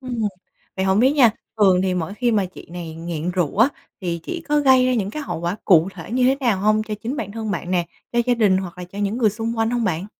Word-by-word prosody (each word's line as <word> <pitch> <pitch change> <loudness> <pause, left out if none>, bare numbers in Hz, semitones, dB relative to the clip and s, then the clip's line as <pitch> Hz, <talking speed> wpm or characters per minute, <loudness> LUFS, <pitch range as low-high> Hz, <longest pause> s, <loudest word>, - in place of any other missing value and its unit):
Ừm. 255 -3 -5 0.6
Vậy 190 - 0
hổng 190 +2 +3
biết 260 +3 +5
nha, 255 -7 +6 0.3
thường 190 -3 +5
thì 185 -1 0
mỗi 180 +3 -3
khi 240 0 +1
mà 200 -3 +2
chị 180 - -13
này 170 -3 -6
nghiện 165 0 -4
rượu 180 0 -1
á, 235 +5 +6 0.3
thì 170 -3 -3
chị 340 - -5
có 295 0 +3
gây 260 -2 +5
ra 255 - +2
những 200 -3 -1
cái 305 +6 -5
hậu 170 - -5
quả 170 +4 -2
cụ 170 -1 +5
thể 170 +3 -9
như 255 0 +2
thế 260 +2 +4
nào 225 -7 +1
hông 215 +1 +3
cho 215 -1 -4
chính 255 +6 -3
bản 200 -5 -4
thân 220 -2 -4
bạn 180 -3 -3
nè, 175 -2 +1 0.3
cho 240 - 0
gia 245 - +3
đình 205 -5 +3
hoặc 185 -1 -5
là 180 - -5
cho 195 +3 -11
những 205 +2 -1
người 225 -4 +3
xung 225 +2 -4
quanh 225 +1 +1
hông 240 -2 0
bạn? 180 +1 -1
205 Hz, 280 wpm, -21 LUFS, 180-240 Hz, 0.6 s, nha